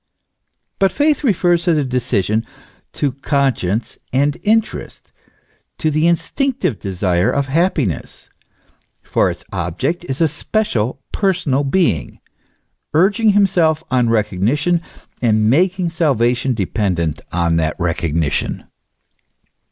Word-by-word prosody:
But 195 -1 +3
faith 300 +1 +1
refers 175 -7 +2
the 160 -4 +2
decision 115 -5 0 0.5
to 145 - 0
conscience 130 -7 -1
and 140 +3 +2
interest, 220 +1 -1 0.7
to 155 - 0
the 155 +2 +2
instinctive 170 - 0
desire 95 +1 0
of 140 +2 0
happiness; 145 - -1 0.8
for - - +1
its - - -7
object 95 - -2
is 130 - -3
a 165 - +4
special, 140 - -1
per 195 -2 +2
sonal 145 -6 -1
Being, 115 - 0 0.8
urging 205 +6 +4
himself 175 -6 +2
on 125 -2 +2
recognition, 115 - +1 0.4
and 110 -3 +2
making 180 +3 +2
salva 135 -8 +2
tion 125 +1 -1
dependent 90 -6 -1
on 85 -1 +1
that 80 -1 0
recognition. 85 -2 -1
135 Hz, 110 wpm, -18 LUFS, 105-175 Hz, 0.8 s, a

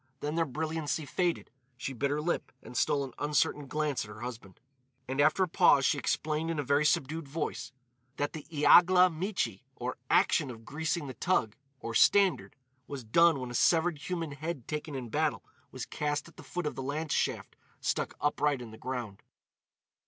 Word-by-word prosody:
Then 150 +1 -2
their 165 0 +1
brilliancy 155 +2 -2
faded; 175 +3 -1 0.3
she 135 +2 -4
bit 140 +3 -1
her 145 +1 -1
lip 170 +3 -2
and - - -11
stole 140 +2 +2
an 135 - -7
uncertain 145 -1 +1
glance 150 0 -1
at 105 - -11
her 105 +1 -10
husband. 115 -6 -8 0.5
And 135 +2 0
after 155 +6 +4
a - - +1
pause 140 -4 +5
she 145 - +2
explained 155 +3 -1
in 165 - -2
a 145 - 0
very 140 +3 +2
subdued 155 0 0
voice 150 -3 -4 0.5
that 145 0 -1
the 155 - -8
"Iagla 180 +4 +6
michi," 160 - -2
or 125 +1 -4
action 150 -4 +3
of 115 -2 -10
"greasing 160 +1 -2
the 130 - -6
toug," 115 - +1 0.3
or 115 - -5
standard, 195 - +4 0.3
was 140 -3 -6
done 165 +6 +4
when 125 -1 -5
a - - -7
severed 165 +3 +3
human 165 0 -3
head 145 -3 -5
taken 150 -1 -4
in 125 -3 -5
battle - - 0 0.3
was - - -6
cast 145 +1 -2
at 165 - -17
the - - -11
foot 180 -2 -5
of 150 - -1
the - - -6
lance 150 +4 -2
shaft - - -1 0.2
stuck - - -1
upright 145 -1 +1
in 120 -3 -9
the 110 - -12
ground. 120 -6 -5
145 Hz, 190 wpm, -30 LUFS, 130-160 Hz, 0.5 s, Iagla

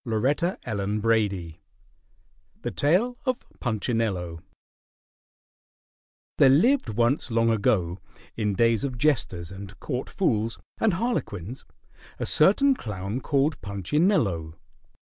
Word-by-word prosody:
CHAPTER 135 - 0
IV 105 -5 0 1.1
THE - - -2
TALE 205 +12 +2
OF 255 -1 -1
PUNCHINELLO 110 -7 -2 2.0
There 135 - +7
lived 225 - +4
once 120 +7 +1
long 115 0 +2
ago, 95 -4 +1 0.4
in 105 -3 -1
days 115 +1 +2
of 130 -3 -3
jesters 110 - 0
and 100 +1 -10
court 130 -3 -4
fools 115 - 0 0.2
and 215 -6 +2
harlequins, 130 - -3 0.5
a - - -3
certain 240 - +5
clown 105 - -5
called 145 +2 0
Punchinello. 100 - 0
115 Hz, 100 wpm, -26 LUFS, 100-150 Hz, 2.0 s, There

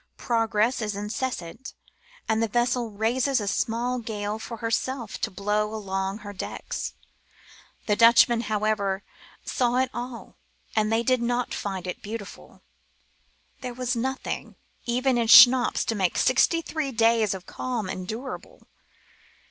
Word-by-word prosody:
Progress 225 0 +1
is 210 -2 -2
incessant, 210 0 -5 0.5
and 220 0 +1
the 225 - +2
vessel 240 +1 0
raises 240 +6 +1
a 205 - -4
small 240 +4 -1
gale 215 -2 -4
for 230 +1 -7
herself 230 +1 -2
to - - 0
blow 210 +2 -1
along 195 -1 -3
her 205 -2 -9
decks. 190 - -5 0.9
The 210 - +2
Dutchmen, 230 +1 +6
how 215 -1 -1
ever, 200 -2 0 0.4
saw 245 -1 0
it 255 0 +1
all, 240 0 -7 0.4
and 215 0 +2
they 225 +1 +2
did 255 0 +2
not 245 +1 -1
find 190 -3 -4
it 180 - -5
beautiful. 210 -1 -9 1.0
There 250 -1 -6
was 250 0 -1
nothing 265 +3 -3 0.3
even 250 +1 +1
in 230 - +1
schnapps 245 +2 +8
to - - 0
make 190 -5 0
sixty 330 +6 +3
three 310 -4 -3
days 225 -3 +3
of 185 -1 -9
calm 240 -6 -4
endurable. 220 +8 -7
230 Hz, 140 wpm, -26 LUFS, 210-245 Hz, 1.0 s, schnapps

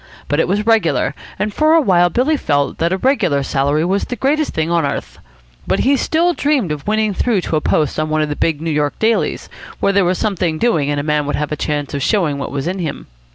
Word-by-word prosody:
But 145 - 0
it - - +2
was 205 +3 0
regular, 170 - +2 0.2
and 210 0 -2
for 310 +5 +3
a - - +6
while 175 - +3
Billy 260 - +1
felt 145 - -1
that 170 +1 +1
a 190 - +1
regular 185 - +1
salary 140 +4 0
was 195 +3 0
the 245 - -4
greatest 295 +4 0
thing 160 +1 -2
on 170 -1 +2
earth. 140 0 -4 0.5
But - - +1
he 275 +3 +3
still 335 +6 +1
dreamed 285 - 0
of 150 +3 -5
winning 215 -1 +1
through 215 0 0
to 165 - -2
a 155 - +1
post 150 -1 0
on 155 0 -1
one 155 0 +1
of 150 - -3
the 145 - -2
big 155 -1 -1
New 165 0 -2
York 150 -1 -1
dailies, 225 +1 0 0.3
where 200 - +1
there 200 0 +3
was 180 +1 +1
something 180 -6 -1
doing 160 -10 +1
and 145 0 0
a - - -3
man 150 -1 0
would 145 - -1
have 150 0 -3
a - - 0
chance 145 -1 -3
of 140 - -2
showing 155 -5 +1
what - - -4
was 140 -1 -3
in 185 +3 -2
him. 160 -5 -4
170 Hz, 250 wpm, -17 LUFS, 150-215 Hz, 0.5 s, a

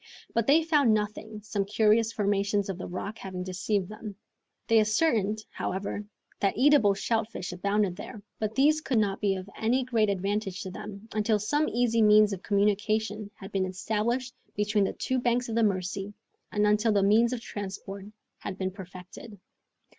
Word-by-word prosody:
But 230 -1 +1
they 310 +4 +5
found 290 -8 +4
nothing, 215 0 -4
some 205 -1 -1
curious 215 +2 +3
formations 200 -1 0
of 190 -1 -4
the - - -5
rocks 200 +4 -5
having 185 -2 -5
deceived 185 +1 -1
them. 215 0 -8 0.5
They 225 -1 +4
ascertained, 215 -2 +1
however, 195 +2 -3 0.4
that 200 0 0
eatable 255 -6 +5
shellfish 220 -3 -2
abounded 200 0 0
there, 210 - -9 0.2
but 215 0 -2
these 305 +4 +4
could 265 -5 0
not 200 -2 +1
be 200 -2 +2
of 185 0 -6
any 245 +4 +1
great 230 -4 +1
advantage 195 0 -2
to 190 - -6
them 205 +3 -9
until 215 0 +2
some 290 +9 0
easy 230 -1 +2
means 210 -1 +6
of 190 - -6
communication 210 +1 0
had 195 +1 -10
been 190 -1 0
established 225 +7 -2 0.2
between 210 0 +2
the - - -2
two 260 0 -1
banks 245 0 0
of - - -3
the 230 - +3
Mercy, 195 0 -1 0.4
and 210 0 +2
until 210 +2 +3
the 200 -2 +3
means 225 +4 +4
of 250 - -2
transport 200 -2 -7 0.3
had 195 - -6
been 190 -1 -2
perfected. 185 +3 -11
210 Hz, 170 wpm, -28 LUFS, 195-225 Hz, 0.5 s, means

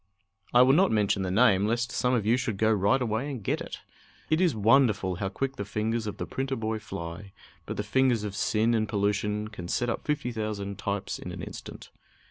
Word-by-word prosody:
I 120 +1 +7
will 130 +1 +5
not 185 +5 +5
mention 105 -2 +2
the 95 - -1
name, 100 -1 +4
lest 120 +3 0
some 125 0 +1
of 110 -4 0
you 115 +3 +4
should 120 -5 -2
go 110 +2 +3
right 105 +5 +3
away 120 +3 -1
and 130 -7 -6
get - - -1
it. - - -7 0.5
It 155 +3 +3
is 175 -8 +3
wonderful 105 -5 +3
how 95 0 -2
quick 135 +7 -3
the 100 - -2
fingers 110 +2 -2
of 105 - -5
the - - -3
printer 135 0 -3
boy 110 -1 -2
fly, 90 0 -7 0.3
but - - -4
the 105 - -1
fingers 120 0 +2
of 100 -2 -4
sin 110 +3 +1
and 110 -2 0
pollution 105 +1 0
can 90 -5 -8
set 120 +6 0
up - - -4
fifty 145 -5 -1
thousand 105 -3 -4
types 100 -1 -3
in - - -7
an - - -7
instant. - - -9
110 Hz, 220 wpm, -28 LUFS, 100-125 Hz, 0.5 s, I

